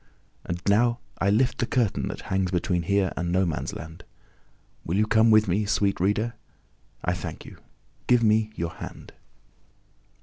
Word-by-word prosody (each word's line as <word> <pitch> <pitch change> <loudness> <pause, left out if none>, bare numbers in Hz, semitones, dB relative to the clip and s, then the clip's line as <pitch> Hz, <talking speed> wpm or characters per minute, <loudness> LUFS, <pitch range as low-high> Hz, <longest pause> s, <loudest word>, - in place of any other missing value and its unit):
And 85 0 -4
now 115 +4 +3 0.2
I 100 - +2
lift 125 +5 +2
the 120 - 0
curtain 120 -6 0
that - - -5
hangs 95 -1 -1
between 90 0 0
here 100 +1 +1
and 85 0 -2
No 95 +1 +2
man's 80 -3 -3
land. 80 0 -9 0.8
Will 85 - -1
you 105 - +3
come 110 +1 +4
with 110 -1 +5
me, 95 +4 +1
sweet 100 -1 +1
Reader? 105 +5 +1 0.7
I 90 - +1
thank 90 - -6
you. - - -12 0.5
Give 125 -1 +4
me 110 0 +3
your 85 -3 -3
hand. - - -10
100 Hz, 165 wpm, -26 LUFS, 90-110 Hz, 0.8 s, with